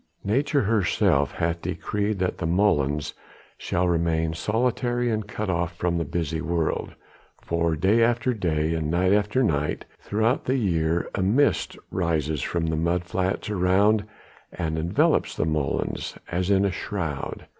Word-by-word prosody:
Nature 140 Hz, +6 st, +1 dB
herself 105 Hz, -4 st, +2 dB
hath 85 Hz, 0 st, -1 dB
decreed 105 Hz, 0 st, -2 dB
that 90 Hz, -1 st, -1 dB
the 85 Hz, -, -1 dB
molens 75 Hz, -6 st, +1 dB, 0.4 s
shall 90 Hz, +1 st, -1 dB
remain 80 Hz, -1 st, +1 dB
solitary 120 Hz, +6 st, 0 dB
and 110 Hz, -1 st, -2 dB
cut 105 Hz, 0 st, -4 dB
off 85 Hz, -1 st, -1 dB
from 85 Hz, -1 st, 0 dB
the -, -, 0 dB
busy 80 Hz, +1 st, -2 dB
world, 85 Hz, -2 st, -1 dB, 0.5 s
for 85 Hz, -1 st, 0 dB
day 95 Hz, +9 st, +3 dB
after 120 Hz, +2 st, +2 dB
day 80 Hz, -6 st, 0 dB
and 80 Hz, -2 st, -2 dB
night 90 Hz, +3 st, +2 dB
after 105 Hz, +5 st, +2 dB
night 75 Hz, -8 st, 0 dB
throughout 110 Hz, +5 st, 0 dB
the 130 Hz, +2 st, +1 dB
year 85 Hz, -6 st, 0 dB
a 95 Hz, -, -1 dB
mist 115 Hz, +10 st, +2 dB
rises 80 Hz, -4 st, 0 dB
from 85 Hz, -2 st, -1 dB
the 80 Hz, 0 st, 0 dB
mud 85 Hz, +2 st, 0 dB
flats 90 Hz, +2 st, -2 dB
around 100 Hz, +3 st, +3 dB, 0.5 s
and 80 Hz, -2 st, -3 dB
envelops 85 Hz, +2 st, +1 dB
the -, -, 0 dB
molens 75 Hz, -3 st, -2 dB
as 90 Hz, +2 st, -1 dB
in 100 Hz, 0 st, +4 dB
a 100 Hz, -, +1 dB
shroud. 85 Hz, -7 st, -4 dB
90 Hz, 150 wpm, -25 LUFS, 80-105 Hz, 0.5 s, in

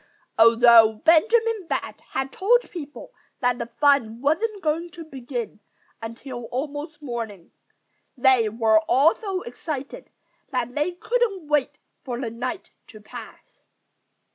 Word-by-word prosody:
Although 230 Hz, -1 st, +7 dB
Benjamin 440 Hz, +4 st, +3 dB
Bat -, -, -4 dB
had 265 Hz, 0 st, -2 dB
told 480 Hz, -, +2 dB
people 305 Hz, -, -9 dB, 0.3 s
that 245 Hz, -1 st, +1 dB
the 235 Hz, -, -4 dB
fun 280 Hz, -6 st, +3 dB
wasn't 385 Hz, -, 0 dB
going 325 Hz, +3 st, -1 dB
to 335 Hz, -2 st, -9 dB
begin 245 Hz, -6 st, -6 dB, 0.4 s
until 240 Hz, +2 st, -7 dB
almost 295 Hz, +5 st, -5 dB
morning, 225 Hz, -9 st, -6 dB, 0.7 s
they 250 Hz, -3 st, +4 dB
were 220 Hz, 0 st, +3 dB
all 280 Hz, +6 st, +5 dB
so 390 Hz, -4 st, -4 dB
excited 275 Hz, +3 st, -7 dB, 0.4 s
that 250 Hz, -2 st, -2 dB
they 300 Hz, +6 st, -1 dB
couldn't 400 Hz, -3 st, -1 dB
wait 295 Hz, -3 st, 0 dB, 0.3 s
for 245 Hz, -3 st, -5 dB
the 240 Hz, -4 st, -4 dB
night 255 Hz, +9 st, -5 dB, 0.2 s
to 215 Hz, -, -13 dB
pass. 210 Hz, -, -12 dB
275 Hz, 125 wpm, -24 LUFS, 235-330 Hz, 0.7 s, Although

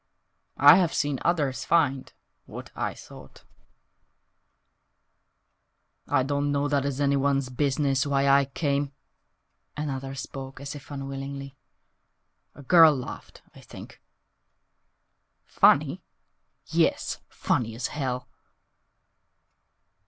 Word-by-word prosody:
"I 145 Hz, +4 st, +8 dB
have 180 Hz, -4 st, +1 dB
seen 145 Hz, -2 st, -1 dB
others 150 Hz, -6 st, 0 dB
find 135 Hz, -6 st, +1 dB, 0.4 s
What -, -, -9 dB
I -, -, -3 dB
sought."....... -, -, -14 dB, 2.6 s
"I 130 Hz, -, +2 dB
don't 145 Hz, +1 st, -1 dB
know 145 Hz, 0 st, 0 dB
that 140 Hz, -1 st, 0 dB
it's 140 Hz, -1 st, -3 dB
anyone's 140 Hz, -1 st, +1 dB
business 135 Hz, +1 st, 0 dB
Why 140 Hz, -1 st, +1 dB
I 140 Hz, 0 st, +5 dB
came," 140 Hz, 0 st, -2 dB, 0.8 s
(Another 135 Hz, -2 st, -4 dB
spoke 135 Hz, 0 st, -8 dB
as 140 Hz, 0 st, -6 dB
if 145 Hz, -2 st, -12 dB
unwillingly), 135 Hz, 0 st, -6 dB, 1.0 s
"A 145 Hz, -, -12 dB
girl 160 Hz, +1 st, +7 dB
laughed, 130 Hz, -1 st, -9 dB
I -, -, -15 dB
think -, -, -13 dB, 1.4 s
Funny? -, -, +3 dB, 0.6 s
Yes, -, -, 0 dB
funny 115 Hz, -3 st, -1 dB
as 120 Hz, +1 st, -3 dB
hell!" 125 Hz, -4 st, -4 dB
140 Hz, 100 wpm, -26 LUFS, 135-145 Hz, 2.6 s, I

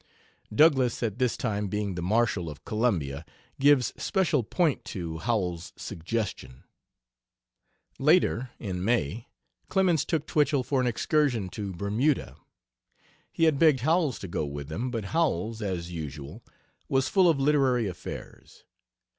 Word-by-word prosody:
Douglass 130 Hz, -1 st, +4 dB
at 110 Hz, 0 st, -2 dB
this 125 Hz, -2 st, +1 dB
time 105 Hz, -3 st, -1 dB
being 105 Hz, 0 st, -2 dB
the 85 Hz, -, -4 dB
Marshal 105 Hz, -2 st, +1 dB
of 75 Hz, -, -11 dB
Columbia, 85 Hz, -, -1 dB, 0.4 s
gives 140 Hz, -3 st, +4 dB
special 180 Hz, -8 st, +1 dB
point 155 Hz, -, 0 dB
to 85 Hz, -4 st, -5 dB
Howells's 90 Hz, -6 st, -2 dB
suggestion. 85 Hz, -, -5 dB, 1.4 s
Later, 135 Hz, -5 st, +3 dB
in 90 Hz, -4 st, -4 dB
May, 115 Hz, -, 0 dB, 0.4 s
Clemens 185 Hz, -6 st, +2 dB
took 160 Hz, -3 st, -1 dB
Twichell 145 Hz, -3 st, +2 dB
for 135 Hz, 0 st, 0 dB
an 125 Hz, -, +1 dB
excursion 120 Hz, -4 st, +1 dB
to 100 Hz, 0 st, -5 dB
Bermuda. 105 Hz, -, 0 dB, 1.0 s
He 165 Hz, -, -1 dB
had 155 Hz, -4 st, +4 dB
begged 155 Hz, -6 st, +5 dB
Howells 155 Hz, -2 st, +2 dB
to 95 Hz, -, -7 dB
go 85 Hz, -, -2 dB
with 70 Hz, 0 st, -6 dB
them, 115 Hz, +11 st, -3 dB
but 115 Hz, -4 st, -3 dB
Howells, 115 Hz, -, 0 dB
as 90 Hz, -4 st, -3 dB
usual, 75 Hz, -, -7 dB, 0.5 s
was 135 Hz, 0 st, +2 dB
full 185 Hz, -3 st, +4 dB
of 155 Hz, -4 st, +2 dB
literary 135 Hz, -5 st, +3 dB
affairs. 90 Hz, -3 st, -9 dB
115 Hz, 135 wpm, -27 LUFS, 90-140 Hz, 1.4 s, begged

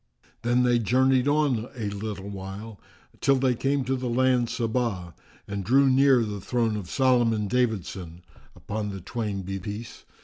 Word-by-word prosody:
Then 120 Hz, +1 st, +2 dB
they 120 Hz, -1 st, +3 dB
journeyed 130 Hz, +3 st, +3 dB
on 145 Hz, -6 st, +1 dB
a 110 Hz, -4 st, -3 dB
little 100 Hz, -1 st, -5 dB
while 100 Hz, +2 st, -8 dB, 0.4 s
till 140 Hz, -, +3 dB
they 130 Hz, -1 st, +2 dB
came 135 Hz, +3 st, 0 dB
to 130 Hz, +1 st, -1 dB
the 125 Hz, -1 st, -3 dB
land 125 Hz, -1 st, +2 dB
Saba 115 Hz, -7 st, -2 dB, 0.3 s
and 100 Hz, -1 st, -4 dB
drew 135 Hz, +5 st, +4 dB
near 130 Hz, -2 st, +5 dB
the 105 Hz, -2 st, -5 dB
throne 115 Hz, 0 st, 0 dB
of 100 Hz, -5 st, -6 dB
Solomon 120 Hz, -5 st, +2 dB
David 110 Hz, -5 st, +1 dB
son, 85 Hz, -2 st, -9 dB, 0.3 s
(upon 105 Hz, 0 st, -4 dB
the 95 Hz, -1 st, -6 dB
twain 100 Hz, 0 st, -4 dB
be 95 Hz, +1 st, -4 dB
peace!) 105 Hz, +5 st, -7 dB
115 Hz, 165 wpm, -26 LUFS, 100-130 Hz, 0.4 s, near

